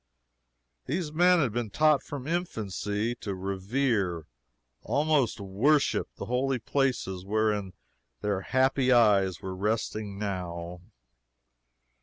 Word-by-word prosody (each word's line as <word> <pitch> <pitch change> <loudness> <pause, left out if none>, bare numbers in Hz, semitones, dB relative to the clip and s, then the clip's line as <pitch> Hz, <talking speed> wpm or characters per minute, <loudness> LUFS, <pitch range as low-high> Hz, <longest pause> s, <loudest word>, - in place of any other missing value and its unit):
These 155 +2 -2
men 180 +3 +5
had 135 -10 +1
been 120 -2 -2
taught 155 +5 +3
from 140 -3 -7
infancy 110 - -2
to 100 -4 -4
revere, 95 - -1 0.6
almost 145 -5 +1
to 100 - -7
worship, 130 +10 +2
the - - -6
holy 130 +3 0
places 120 -8 -1
whereon 105 -1 0 0.5
their 100 -2 -1
happy 130 +2 +2
eyes 100 -6 +4
were 95 -1 -4
resting 105 0 -2
now. 90 -3 -4
110 Hz, 110 wpm, -28 LUFS, 95-135 Hz, 0.6 s, men